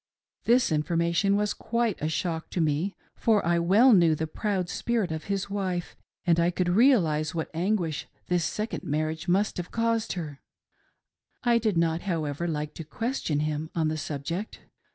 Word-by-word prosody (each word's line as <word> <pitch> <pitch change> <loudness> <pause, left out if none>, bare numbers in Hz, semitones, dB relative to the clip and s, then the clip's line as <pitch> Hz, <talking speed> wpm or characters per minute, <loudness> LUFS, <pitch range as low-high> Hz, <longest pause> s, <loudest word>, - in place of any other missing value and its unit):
This 240 -4 +4
information 170 +5 +1
was 210 0 +1
quite 235 -3 -1
a 155 - 0
shock 160 0 -2
to - - -3
me, 160 +4 0 0.2
for 215 -5 +2
I 170 0 +2
well 210 +9 +5
knew 170 -5 +5
the 160 - -2
proud 185 +2 -2
spirit 225 -2 -1
of 160 0 -4
his 200 -1 -2
wife 190 -3 -3 0.3
and 170 -1 +3
I 170 +1 +3
could 180 0 -1
realise 175 - +3
what 160 - -3
anguish 170 -3 -1 0.2
this 175 -2 +1
second 215 +6 -3
marriage 155 +3 -2
must 195 +4 +1
have: 180 -1 -4
caused 230 -1 0
her,; 150 -6 -6 1.0
I 240 -1 +4
did 215 -5 0
not, 165 0 +1
however, 165 -3 -2
like 150 -2 -3
to 165 - -7
question 165 - -2
him 155 +1 -2
on 160 -2 +1
the 155 - -1
subject. 155 +7 -4
175 Hz, 170 wpm, -27 LUFS, 160-205 Hz, 1.0 s, well